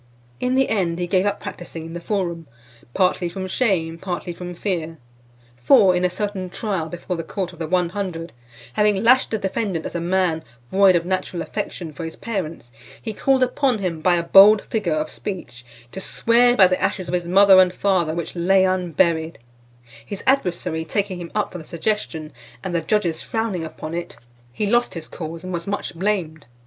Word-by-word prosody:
In 250 +1 0
the 265 0 +3
end, 180 -6 0
he 175 - -1
gave 185 +2 +2
up 205 0 -1
practising 165 -2 -7
in 165 - -8
the 175 - -4
forum, 170 -4 -3 0.5
partly 180 -2 +2
from 190 +2 -5
shame, 180 -7 0
partly 180 -1 -4
from 180 0 -7
fear. 165 -4 -3 0.6
For, 180 - +5
in 180 - 0
a 180 - +3
certain 195 -1 -4
trial 185 -5 -3
before 175 +2 -4
the 165 - -4
court 185 +1 -4
of 170 - -15
the 160 - -3
One 180 0 +1
Hundred, 175 -4 -5 0.4
having 210 - +2
lashed 255 +3 +5
the 220 - -1
defendant 195 -3 -2
as - - -5
a 170 - -2
man 175 -2 +1 0.3
void 195 -1 +5
of 170 0 +1
natural 185 -2 -2
affection 175 -6 -5
for 165 - -7
his 165 0 -6
parents, 170 - -5 0.3
he 220 - -5
called 265 +4 +2
upon 255 -1 +1
him 180 -5 -3
by 175 +2 +4
a 170 - 0
bold 200 +4 +7
figure 210 -7 -2
of 155 0 -1
speech, 175 - -7 0.3
"to 190 - -6
swear 245 +4 +3
by 190 - +8
the 185 0 +1
ashes 185 -3 -1
of 170 - -5
his 175 -1 -1
father 190 +1 +7
and 180 -1 +3
mother 180 -5 +2
which 170 0 -4
lay 190 +2 +3
unburied;" 170 -3 +1 0.7
his 195 - -7
adversary 180 -10 +1
taking 190 +1 -2
him 170 - -8
up 210 - 0
for 180 - -7
the - - -9
suggestion, 165 -3 -3 0.3
and 185 - -4
the 170 - +1
judges 175 -3 0
frowning 220 -6 -2
upon 155 0 -7
it, 175 +3 -5 0.3
he 210 - -2
lost 240 -1 +1
his 160 -2 -7
cause, 165 0 -7
and 185 0 -5
was 170 +1 -4
much 205 +1 -3
blamed. 170 -5 -2
180 Hz, 195 wpm, -22 LUFS, 170-200 Hz, 0.7 s, by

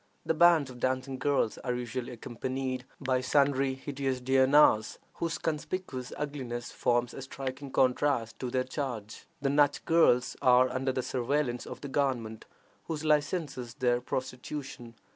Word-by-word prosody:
The - - +2
bands 165 -4 +5
of 125 - -11
dancing 130 +1 -1
girls 140 -6 +1
are 125 -1 -2
usually 125 0 -4
accompanied 130 +2 -4
by 130 -2 0
sundry 135 0 +2
hideous 135 -1 -3
duennas, 130 -3 +4 0.2
whose 165 -1 -1
conspicuous 150 -4 -4
ugliness 130 -5 -4
forms 120 0 +1
a - - -7
striking 135 +1 -6
contrast 130 -2 +1
to 125 - -3
their 130 +1 0
charge. 125 -6 -5 0.2
The 135 - +2
Nach 145 0 +3
girls 125 -7 +4
are 125 0 +5
under 130 +1 0
the 130 0 -2
surveillance 130 0 -1
of - - -8
the 145 - -5
government, 125 -6 -1 0.4
which 160 -2 -3
licenses 150 -5 0
their 120 -1 +1
prostitution. 130 -1 -5
130 Hz, 145 wpm, -30 LUFS, 125-145 Hz, 0.4 s, bands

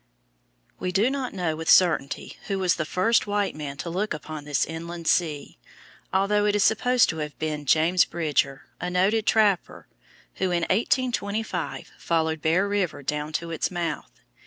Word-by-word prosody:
We 180 - -2
do 205 +7 +2
not 270 -2 -3
know 175 -5 -2
with 160 +1 -4
certainty 170 -6 +3
who 195 - -1
was 185 -2 +2
the 155 - -1
first 220 +8 +2
white 205 -1 0
man 145 -2 -6
to 135 - -5
look 195 +1 -1
upon 155 -1 -8
this 145 -2 +1
inland 170 +1 -7
sea, 155 - 0 0.5
although 205 +2 +2
it 205 - +2
is 205 - +3
supposed 245 +3 +3
to 165 - -2
have 150 -1 -5
been 150 -2 -3
James 165 +5 +4
Bridger, 145 -4 -1 0.2
a 180 - -3
noted 195 +5 +1
trapper, 210 -4 +2 0.5
who - - 0
in 175 -2 0
1825 205 - -1
followed 160 -2 0
Bear 175 +6 +2
River 195 -8 -1
down 150 +2 -3
to 165 +1 -3
its 165 - -1
mouth. 170 -4 -4
175 Hz, 165 wpm, -25 LUFS, 155-205 Hz, 0.5 s, James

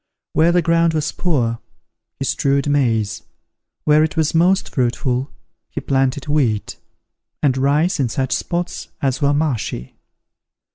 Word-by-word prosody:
Where 165 +2 +4
the 175 0 +2
ground 165 0 +2
was 150 -1 0
poor, 120 -10 0 0.6
he 135 - -3
strewed 140 +1 +1
maize; 115 -8 +1 0.6
where 150 0 +4
it 160 +2 -2
was 155 -2 +1
most 180 +4 +2
fruitful, 125 +1 0 0.4
he - - -4
planted 135 +1 0
wheat; 125 -9 0 0.7
and 135 -3 +3
rice 145 +7 +1
in 130 -4 +1
such 130 +3 -1
spots 175 0 -3
as 135 -2 -1
were 140 0 +3
marshy. 140 - -2
145 Hz, 135 wpm, -19 LUFS, 130-160 Hz, 0.7 s, Where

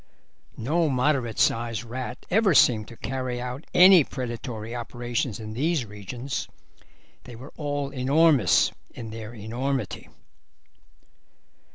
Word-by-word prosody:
No 155 +7 +1
moderate 130 -3 0
sized 115 0 +1
rat 125 +1 -6
ever 200 -3 +3
seemed 110 -6 +5
to 115 - -12
carry 130 -1 -3
out 125 +5 -6
any 180 -2 +8
predatory 120 -3 -6
operations 120 -1 -3
in 110 -1 -7
these 150 +2 0
regions; 110 +6 -5 0.8
they 120 - -10
were 130 +5 -11
all 145 -2 -3
enormous 140 - +3 0.2
in 115 -2 -7
their 110 +1 -8
enormity. 125 +6 -3
125 Hz, 110 wpm, -25 LUFS, 115-140 Hz, 0.8 s, any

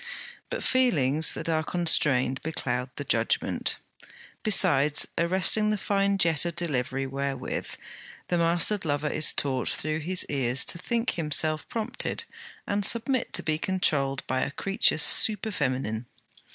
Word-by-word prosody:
But - - -4
feelings 160 - +2
that - - -6
are 160 -1 +1
constrained 140 -7 +1
becloud 125 -5 -3
the 145 - -4
judgement 115 -4 0 0.7
besides 150 -8 +3
arresting 190 +5 +2
the 215 - 0
fine 200 0 0
jet 165 -5 +2
of 170 -1 -3
delivery 135 -5 -2
wherewith 135 -1 -4 0.5
the 175 - 0
mastered 170 +5 +3
lover 150 -1 -1
is 155 - +3
taught 130 -3 -1
through 155 +1 -2
his 180 +4 -1
ears 135 -2 0
to 170 - -1
think 235 +6 -1
himself 155 -1 0
prompted, 230 +2 -4 0.4
and 205 0 -1
submit 235 +4 +2
to - - -1
be 155 -1 -1
controlled, 145 -8 -1
by 130 - -1
a - - -1
creature 195 +7 0
super 215 +6 +4
feminine. 130 - -2
155 Hz, 140 wpm, -26 LUFS, 135-190 Hz, 0.7 s, super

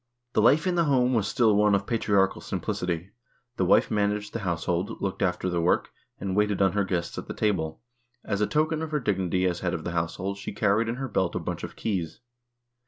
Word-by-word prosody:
The - - +3
life 145 - +5
in 185 - +1
the 170 -1 +2
home 130 -3 +3
was 110 -4 +1
still 110 -1 +3
one 105 0 +4
of 100 0 -1
patriarchal 100 -4 +1
simplicity. 90 +1 -3 0.5
The 95 - +2
wife 90 - +4
managed 105 0 0
the 115 - -2
house 85 -5 -2
hold, 90 +2 -1
looked 95 - -3
after 90 0 0
the 90 -2 0
work, 85 - +1 0.3
and 95 -1 -2
waited 105 -1 +2
on 95 -1 +4
her 100 0 +1
guests 90 -3 -2
at - - -9
the - - -6
table. 95 -7 -1 0.4
As 100 -1 -1
a 105 - +3
token 155 +1 +1
of 160 - -3
her 150 -1 0
dignity 95 -6 0
as 90 -1 0
head 90 -1 -1
of 80 - -5
the 85 - -3
household 85 +4 -2
she - - -6
carried 105 +3 +2
in 115 - -1
her 135 +1 -4
belt 95 -6 0
a - - 0
bunch - - -5
of - - -6
keys. 95 -6 -3
100 Hz, 230 wpm, -27 LUFS, 90-110 Hz, 0.5 s, life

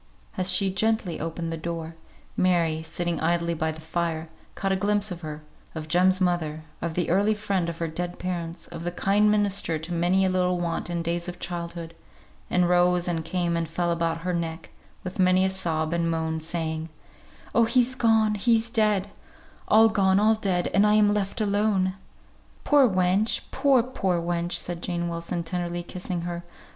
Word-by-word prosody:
As 185 0 +1
she 190 +1 +2
gently 220 -4 0
opened 165 +1 -4
the 165 - -3
door, 165 0 -5 0.4
Mary, 170 -4 +2
sitting 170 +1 -2
idly 170 +1 +1
by 160 -1 -1
the 160 - -9
fire, 160 0 -3 0.3
caught 195 - -1
a - - +3
glimpse 205 +1 +1
of 175 -1 -6
her, 155 -1 -7 0.3
of 155 -1 -5
Jem's 185 +3 +3
mother, 165 -4 -1 0.2
of 165 -1 -3
the 175 -2 0
early 205 +4 +3
friend 200 -5 -1
of 165 - -6
her 165 - -2
dead 175 +2 -4
parents, 170 -2 -4
of 170 -1 -7
the 175 - -1
kind 200 +4 +2
minister 200 -5 +1
to 160 +3 -6
many 180 +3 +2
a - - +2
little 180 -1 +1
want 170 0 -2
in 170 -1 -2
days 170 +1 -2
of 175 - -8
childhood, 170 -1 -5 0.6
and 180 -1 +2
rose 180 0 +3
and 165 -2 -1
came 170 0 -1
and 165 -1 -2
fell 170 +1 -1
about 165 -1 -1
her 180 +1 -2
neck, 165 -1 -4 0.3
with 185 +1 -7
many 185 0 +4
a - - +2
sob 165 -4 0
and 170 -1 0
moan, 160 -1 -1
saying, 160 0 -3 0.6
"Oh, 230 - +4
he's 245 +2 +2
gone 225 -3 +3
he's 225 +2 +2
dead 210 -3 +1 0.6
all 220 +1 +6
gone 195 -3 +3
all 215 +2 +4
dead, 190 -5 0
and 200 - +5
I 210 - +4
am 210 -1 +4
left 205 +2 -2
alone!" 200 -2 +1 0.7
"Poor 285 -4 +5
wench! 185 +3 +2
poor, 265 -3 +3
poor 190 -8 -1
wench!" 170 +1 -2
said 175 -1 -2
Jane 175 -1 -2
Wilson, 170 +1 -3
tenderly 175 0 -3
kissing 180 0 -5
her. 175 0 -5
175 Hz, 185 wpm, -25 LUFS, 170-195 Hz, 0.7 s, all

